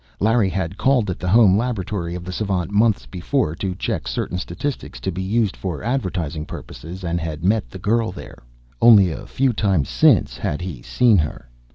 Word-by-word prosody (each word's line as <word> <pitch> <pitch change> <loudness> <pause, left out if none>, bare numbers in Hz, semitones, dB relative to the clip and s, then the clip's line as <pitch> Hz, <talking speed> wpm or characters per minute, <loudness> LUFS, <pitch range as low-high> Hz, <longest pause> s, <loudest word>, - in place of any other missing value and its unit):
Larry 110 -1 +3
had 95 +1 -3
called 125 -8 +2
at 90 - -6
the 90 - -4
home 105 -2 +6
laboratory 100 -6 -2
of 90 - -6
the 90 - -6
savant, 95 -2 -2
months 105 0 +2
before, 95 - -1
to 95 -1 -3
check - - -3
certain 90 - -2
statistics 125 +11 -5
to 95 - -3
be 90 +1 -4
used 105 +1 0
for 90 -5 -5
advertising 90 - -2
purposes 85 +3 -9
and 85 0 -1
had 80 -1 -5
met 105 +3 +1
the - - -9
girl 110 +3 0
there. 90 - -11 0.4
Only 100 -7 +7
a 80 - -7
few 130 -1 +1
times 95 - +1
since - - +3
had 75 - -2
he 90 -9 -6
seen 115 - +3
her. 75 -5 -4
95 Hz, 190 wpm, -21 LUFS, 85-110 Hz, 0.4 s, Only